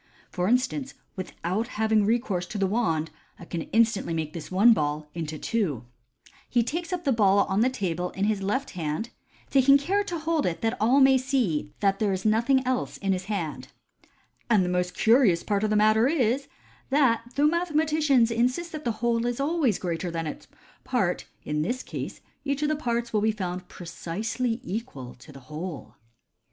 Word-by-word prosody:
For 180 0 -1
instance, 260 +3 0 0.2
without 190 +3 -3
having 220 -1 +3
recourse 210 -6 0
to 210 - -5
the 195 - +1
wand, 165 -7 0 0.3
I - - -11
can 170 -1 -4
instantly 225 -6 +2
make 155 -1 -3
this 160 -3 -7
one 205 +6 +6
ball 150 -3 -2
into 160 -2 -4
two 150 - -2 0.3
" - - -50 0.3
(he 240 -1 +3
takes 335 +8 -4
up 360 -1 -2
the 280 - +2
ball 200 -4 +4
on 190 +1 0
the 250 - +4
table 180 -8 -2
in 195 +2 -2
his 210 -2 0
left 255 +8 -1
hand, 165 +7 -3 0.4
taking 275 +1 +6
care 360 +9 0
so 410 - -1
to - - -6
hold 325 -2 +1
it 170 - -3
that 225 +1 0
all 245 +6 +4
may 265 -1 +6
see 240 - -1
that 195 -1 +2
there 210 -2 +1
is 190 +1 -3
nothing 240 +5 +3
else 255 0 -1
in 195 -1 0
his 185 0 -3
hand), 180 -7 -4 0.4
r< - - -27 0.4
and 210 -5 +4
the - - -1
most 180 0 -1
curious 220 -6 +4
part 205 -1 0
of 215 - +1
the 215 - +1
matter 215 +3 +4
is, 275 -2 +1 0.4
that 265 -5 +3
though 285 - +3
mathematicians 305 -6 +2
insist 250 +9 0
that 310 -2 -6
the 235 - +1
whole 235 0 +1
is 245 +1 -2
always 285 - +1
greater 175 0 -3
than 165 -1 -3
its 150 - -7 0.4
part, - - 0 0.2
in 150 0 -1
this 245 +11 -2
case - - -6 0.2
each 280 0 -1
of 300 - +2
the 310 - +1
parts 235 -5 -2
will 210 - +2
be 220 +1 +3
found 180 -3 -5
precisely 210 +8 -3
equal 185 - -6
to 140 +5 -15
the 135 -1 -12
whole." 155 +4 -7
220 Hz, 195 wpm, -26 LUFS, 180-260 Hz, 0.4 s, one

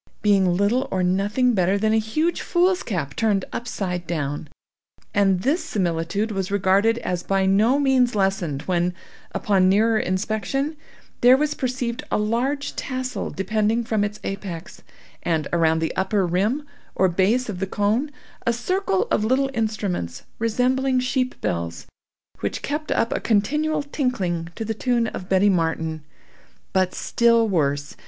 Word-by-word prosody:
Being 190 -4 +3
little 235 +7 +1
or 185 -1 0
nothing 205 +7 +2
better 190 -1 +2
than 215 +1 +1
a 220 - +4
huge 305 +11 -1
foolscap 345 - 0
turned 210 -4 +1
upside 180 -7 -3
down. 145 -2 -3 0.7
And 195 -3 +3
this 295 +8 +1
similitude 180 +3 -1
was 195 -2 -2
regarded 200 +3 +3
as 180 -1 -1
by 195 +1 +1
no 215 +7 +4
means 260 -4 +3
lessened 190 -8 0
when, 175 0 0 0.4
upon 190 -3 +2
nearer 220 +3 +3
inspection, 220 - -1 0.5
there 250 +2 +7
was 300 +1 0
perceived 250 -3 -2
a - - +1
large 240 +7 -1
tassel 255 -1 -3
depending 215 +4 0
from 220 -3 0
its 205 0 -3
apex, 190 -3 -6 0.4
and, 160 -4 0
around 160 -1 +3
the 160 0 -2
upper 190 0 +1
rim 205 - 0 0.3
or 190 - +4
base 195 +8 +2
of 195 -5 -5
the 195 - -1
cone, 210 +9 0 0.3
a 235 - +1
circle 240 - 0
of - - +2
little 265 +4 +1
instruments, 210 - -2 0.2
resembling 255 +3 +1
sheep 255 0 -1
bells, 85 -1 -3 0.5
which - - -3
kept 300 +2 -3
up 230 - +1
a - - -1
continual 300 +8 +1
tinkling 195 - -2
to 225 - -4
the 220 - -1
tune 240 +1 +1
of 185 -4 -6
Betty 195 +2 +4
Martin. 160 -3 -1 0.7
But 185 -1 +1
still 230 -1 +3
worse. 145 -6 0
210 Hz, 145 wpm, -23 LUFS, 185-245 Hz, 0.7 s, there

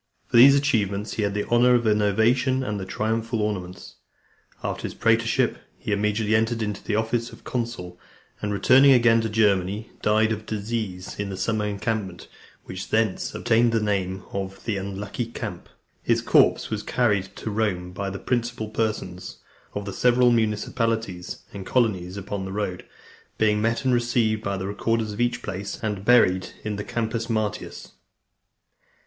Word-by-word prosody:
For - - +3
these 135 +4 +9
achievements 110 -7 0
he - - -2
had 100 -1 -1
the 105 - -1
honour 125 +1 +5
of 120 -1 +1
an 105 -1 +3
ovation, 125 +6 +2
and 105 -5 -3
the 95 - -6
triumphal 110 +3 -1
ornaments. 95 -4 -5 0.7
After - - -3
his - - -5
praetorship, 115 0 +2 0.2
he - - -5
immediately 105 +1 +1
entered 115 +1 +1
on 105 -1 -2
the 105 - 0
office 115 +2 -1
of - - -14
consul, 115 -8 -4 0.4
and 105 - -2
returning 130 +7 +6
again 115 -2 +5
to 110 - -2
Germany, 105 -1 +1
died 110 +1 +3
of 110 -1 -4
disease, 105 -4 -4
in 100 -1 -2
the 95 - -5
summer 110 +1 0
encampment, 100 -3 -3 0.4
which 95 0 -7
thence 110 -3 0
obtained 115 +1 +3
the 115 - +3
name 95 -3 -1
of 95 0 -5
"The 110 -4 -1
Unlucky 100 +4 -4
Camp." 105 -6 -7 0.3
His - - +1
corpse - - +3
was 105 -1 -2
carried 105 -5 0
to 110 - -5
Rome 100 -5 -1
by 100 +2 -4
the 100 - -5
principal 120 -1 -2
persons 110 0 -3 0.4
of 100 0 -3
the 100 - -5
several 125 0 +4
municipalities 110 -3 -1
and 100 -1 -6
colonies 95 -6 0
upon 100 0 -4
the 95 - -6
road, 95 -3 -3 0.5
being 105 -1 +2
met 115 +4 0
and 130 - +3
received 120 -3 +1
by 100 0 -2
the 95 - -4
recorders 110 +2 -1
of 105 - -4
each 120 0 0
place, 100 +1 -5
and 105 -3 -2
buried 95 -6 +4
in 105 -1 -3
the 105 - -4
Campus 115 +1 -3
Martius. 110 -2 -3
110 Hz, 165 wpm, -24 LUFS, 100-115 Hz, 0.7 s, these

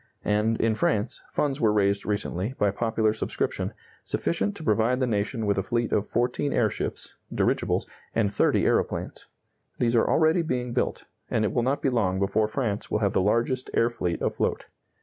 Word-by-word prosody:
And, 105 +2 +1
in 115 -1 +2
France, 105 -1 0
funds 145 -1 -1
were 110 - +4
raised 100 -1 +1
recently, 105 +2 -2
by 100 -1 +2
popular 110 0 +1
subscription, 110 - -2 0.3
sufficient 200 +4 -1
to 160 - -7
provide 115 0 +2
the 130 - +2
nation 110 0 -1
with 100 -1 +1
a - - +2
fleet 120 +4 -1
of 105 - +1
fourteen 125 +4 0
airships 110 -5 -1 0.2
(dirigibles) - - +1 0.3
and 105 -3 +1
thirty - - +2
aeroplanes. - - -1 0.5
These 120 -1 +1
are 115 - +3
already 160 +2 +4
being 125 -6 -2
built, 125 - -1 0.2
and 110 -2 +1
it - - -1
will 120 - +2
not 135 +4 0
be - - +3
long 100 -7 +1
before 100 +3 +1
France 110 -3 -2
will - - +1
have 100 -2 0
the - - +3
largest 120 +6 +1
air 115 +1 +3
fleet 90 -7 -2
afloat. - - -1
110 Hz, 180 wpm, -26 LUFS, 105-125 Hz, 0.5 s, were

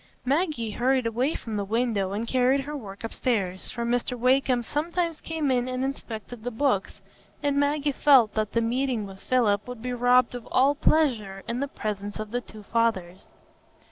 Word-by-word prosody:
Maggie 280 - 0
hurried 255 +3 +1
away 245 +7 0
from 225 -2 -5
the 200 - -1
window 215 -2 0
and 215 +4 -3
carried 260 +2 +3
her 295 +2 -6
work 205 -7 -8
upstairs; 205 -5 -2
for 235 -1 -3
Mr 245 +1 0
Wakem 255 0 +2
sometimes 330 +4 -2
came 315 -4 -1
in 250 -1 +1
and 255 0 -2
inspected 235 -4 -5
the 245 - -2
books, 240 -4 -1 0.4
and 285 -1 +2
Maggie 290 0 +1
felt 265 -6 +5
that 215 -1 -1
the 230 - +2
meeting 240 -1 0
with 195 -1 -10
Philip 210 -3 +1
would 245 -2 -8
be 250 0 -2
robbed 245 0 +4
of 245 -2 -7
all 270 +3 +4
pleasure 235 -11 +1
in 235 +1 -2
the 280 - -1
presence 205 -5 -4
of 215 -1 -6
the 245 +1 -1
two 215 -2 -13
fathers. 195 -6 -1
245 Hz, 180 wpm, -26 LUFS, 215-270 Hz, 0.4 s, felt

